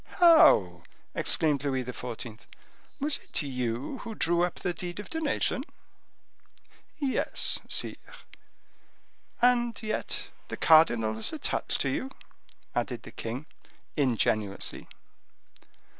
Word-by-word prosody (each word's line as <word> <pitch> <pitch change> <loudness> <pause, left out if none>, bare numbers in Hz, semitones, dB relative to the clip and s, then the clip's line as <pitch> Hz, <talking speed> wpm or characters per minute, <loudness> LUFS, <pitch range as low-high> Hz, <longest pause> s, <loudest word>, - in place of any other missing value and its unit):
"How!" 100 - +6 0.3
exclaimed 145 -3 +1
Louis 130 -2 0
XIV., 120 -2 -7 0.5
"was 290 +1 0
it - - -3
you 125 - -3
who 225 -2 -7
drew 170 -2 +2
up 175 - -1
the 180 - -2
deed 175 +2 -6
of 205 - -8
donation?" 310 -4 0 1.3
"Yes, 280 -4 +2
sire." - - +1 1.5
"And 240 -1 +3
yet 215 - -3 0.2
the - - -6
cardinal 120 -9 +5
was 110 - -4
attached 310 -2 -1
to - - 0
you?" 265 - -2 0.6
added - - -2
the - - -10
king, 120 +6 -5 0.5
ingenuously. 110 -7 0
155 Hz, 105 wpm, -28 LUFS, -, 1.5 s, How